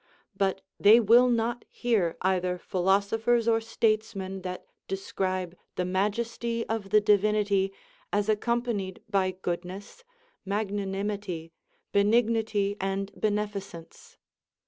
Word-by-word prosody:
But 195 -1 0 0.2
they 215 +3 +8
will 240 +3 +6
not 235 0 0
hear 210 -9 0
either 180 -1 +1
philosophers 200 +6 +1
or 225 -1 +3
statesmen 215 -4 -1
that 180 0 -6 0.2
describe 185 -2 -3 0.2
the 180 - -1
majesty 230 +5 -1
of 220 -3 -3
the 215 - +6
Divinity 205 -1 +2 0.4
as 205 0 +1
accompanied 220 -3 -1
by 195 -3 +1
goodness, 185 - -6 0.4
magnanimity, 200 -3 -3 0.4
benignity, 215 -1 +2
and 195 +1 -2
beneficence. 205 -5 -4
200 Hz, 100 wpm, -28 LUFS, 190-220 Hz, 0.4 s, they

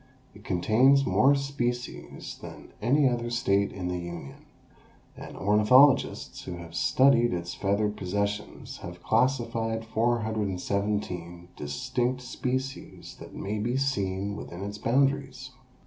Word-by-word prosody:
It 100 0 -15
contains 125 +10 +4
more 125 +9 +4
species 125 -3 -4
than - - -11
any 135 +6 +4
other 120 -1 -1
state 100 -4 +1
in 90 -2 -5
the 90 0 -2
Union, 85 -5 -8 0.7
and - - -10
ornithologists 105 +8 +4
who 90 - -5
have 85 -1 -10
studied 120 +5 +4
its 85 0 -4
feathered 105 +1 0
possessions 100 +2 -3
have - - -9
classified 115 -3 0
417 100 -6 -1
distinct 125 - -2
species 130 +1 -4
that - - -11
may 105 +2 -3
be 120 +5 -1
seen 100 -7 -1
within 95 -2 -7
its 105 +1 -6
boundaries. 135 +1 0
110 Hz, 115 wpm, -27 LUFS, 100-130 Hz, 0.7 s, contains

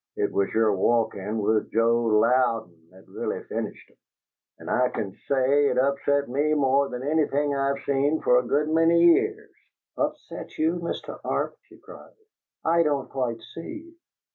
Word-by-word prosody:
It - - -1
was 100 - 0
your 110 -2 +2
walkin' 110 0 0
with 110 0 0
Joe 115 +1 +2
Louden 110 -7 +1
that 95 +1 -19
really - - -4
finished - - -6
'em, - - -31 0.6
and - - -12
I 125 0 +2
can 100 - -4 0.2
say 140 +1 +3
it 125 -2 -1
upset 140 +1 +1
me 145 +5 0
more 140 -1 +2
than 125 +1 -6
anything 145 -1 +1
I've 140 0 -1
seen 140 +3 +1
for 125 - +4
a 125 - -5
good 150 +4 +1
many 165 +1 +4
years." 410 - +3 0.5
"Upset - - -4
you, 165 +3 +1
Mr. 170 - -5
Arp?" - - -2
she - - -17
cried. - - -14 0.5
"I 170 +1 +3
don't 145 -4 -1
quite 120 -4 -2
see." 320 - -9
135 Hz, 160 wpm, -25 LUFS, 115-150 Hz, 0.6 s, for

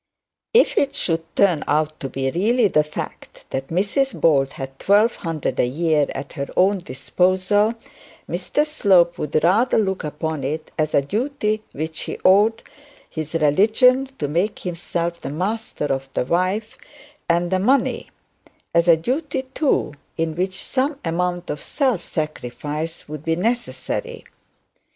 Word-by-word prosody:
If - - +5
it 280 0 0
should 165 -2 0
turn 180 -7 +3
out 155 +1 0
to 135 - -4
be 135 +1 -2
really 220 - +3
the 155 -5 +3
fact 150 - -8
that 135 0 -3
Mrs 210 - 0
Bold 140 -4 +3
had 135 0 -7
twelve 210 +4 +3
hundred 165 -5 -3
a - - +3
year 155 +2 +1
at 140 - -6
her 140 -3 -4
own 195 +2 +4
disposal, 185 - +1 0.5
Mr 180 - 0
Slope 190 - +3
would 150 +1 0
rather 210 +9 +3
look 190 -3 0
upon 150 -1 -3
it 155 +4 -3
as 155 -1 0
a 140 - +4
duty 215 - -1
which 160 +2 -5
he - - -5
owed 210 +4 +5 0.5
his 155 0 -5
religion 220 - +4
to 145 - -2
make 175 +8 0
himself 170 -1 -3
the - - -6
master 190 +3 -3
of 135 -1 -2
the - - +1
wife 200 - -1 0.5
and 170 +1 +2
the 185 - +2
money; 260 +8 +1 0.6
as 170 +1 +3
a 165 -1 +7
duty, 265 - -2
too, 275 - +1 0.2
in 160 -1 -1
which 185 +2 -2
some 275 +2 -1
amount 175 +1 -1
of 150 - -4
self 255 - 0
sacrifice 155 +2 -4
would 150 0 -7
be 165 0 +1
necessary. 245 - -2
175 Hz, 150 wpm, -22 LUFS, 155-215 Hz, 0.6 s, a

